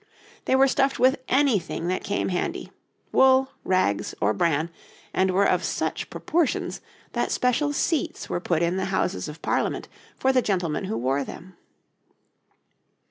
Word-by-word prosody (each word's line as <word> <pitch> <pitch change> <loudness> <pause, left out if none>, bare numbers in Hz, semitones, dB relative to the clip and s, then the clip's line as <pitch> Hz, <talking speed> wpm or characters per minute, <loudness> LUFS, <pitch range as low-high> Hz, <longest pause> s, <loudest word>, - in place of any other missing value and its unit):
They - - +3
were 270 +1 +6
stuffed 270 0 +1
with 260 +2 +4
anything 245 - +1
that 185 - -1
came 200 -1 -1
handy 180 - -3 0.4
wool, 265 0 +5
rags, 185 - 0
or 105 - +2
bran 165 +1 0 0.4
and 190 0 +2
were 195 +2 +3
of - - +1
such - - -2
proportions 330 -3 -1 0.3
that - - -1
special 250 +4 +1
seats 320 +2 -1
were - - -2
put 170 -2 0
in 170 +2 +1
the 190 - -1
Houses 190 - -1
of 150 +2 -11
Parliament - - -1 0.3
for 265 0 +2
the 255 - +4
gentlemen 185 -5 -1
who 115 - -2
wore 135 +4 0
them. 180 +6 -10
190 Hz, 150 wpm, -25 LUFS, 170-265 Hz, 0.4 s, were